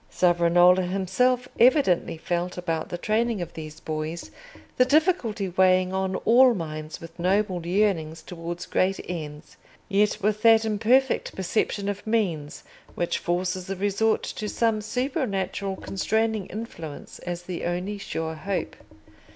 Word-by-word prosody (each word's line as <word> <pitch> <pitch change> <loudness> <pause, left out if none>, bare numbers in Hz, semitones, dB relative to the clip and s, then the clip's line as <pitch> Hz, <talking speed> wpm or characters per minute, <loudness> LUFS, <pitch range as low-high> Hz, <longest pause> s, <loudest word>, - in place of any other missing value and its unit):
Savonarola 175 +1 +4
himself 195 +8 +1
evidently 235 - +4
felt 175 +2 -2
about 165 -2 -2
the 175 - -4
training 220 +3 0
of 175 -1 -5
these 155 -1 -8
boys 155 +2 -5 0.5
the 255 - +6
difficulty 260 - +1
weighing 185 0 +3
on 190 0 -1
all 245 +4 +5
minds 155 -3 -6
with 165 +1 -12
noble 185 0 +1
yearnings 170 -5 0
towards 170 +1 -6
great 190 +1 +1
ends, 155 -3 -7 0.3
yet 205 +1 +2
with 215 +1 0
that 225 -1 +6
imperfect 230 +5 +2
perception 200 +2 -1
of 205 +1 -4
means 175 -10 -1 0.3
which 175 - -1
forces 180 +1 -2
a 195 - -2
resort 205 +3 +1
to 210 - -4
some 225 -1 +1
supernatural 210 - -2
constraining 220 +2 -1
influence 170 -9 -8
as 175 0 -5
the 175 -1 -5
only 180 +4 -2
sure 160 -4 -4
hope. 190 +5 -3
190 Hz, 135 wpm, -25 LUFS, 175-215 Hz, 0.5 s, the